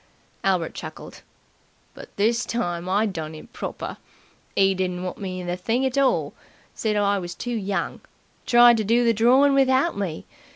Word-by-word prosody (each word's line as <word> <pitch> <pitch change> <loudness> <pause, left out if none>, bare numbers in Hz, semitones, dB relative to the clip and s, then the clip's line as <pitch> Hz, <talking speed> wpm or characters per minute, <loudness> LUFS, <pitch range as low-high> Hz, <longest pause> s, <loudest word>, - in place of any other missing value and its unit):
Albert 185 -4 0
chuckled. - - -9 0.7
"But - - -12
this 230 +4 +1
time 175 -6 -3
I 205 +3 +2
done 160 -6 -5
him 195 +10 -12
proper. - - -6 0.6
'E 195 0 +4
didn't 180 -1 -2
want 185 - -5
me 185 -2 -5
in - - -7
the 175 0 -2
thing 230 +8 -1
at 260 0 -1
all. 275 -2 +1 0.4
Said 215 -2 -1
I 200 -1 +2
was 175 -1 -6
too 245 - -4
young. 200 -3 -3 0.5
Tried 240 -1 +7
to 220 - 0
do 235 +4 +2
the 230 - +4
drawin' 255 +6 +4
without 270 +4 +3
me. 185 -6 -4
205 Hz, 170 wpm, -24 LUFS, 185-240 Hz, 0.7 s, Tried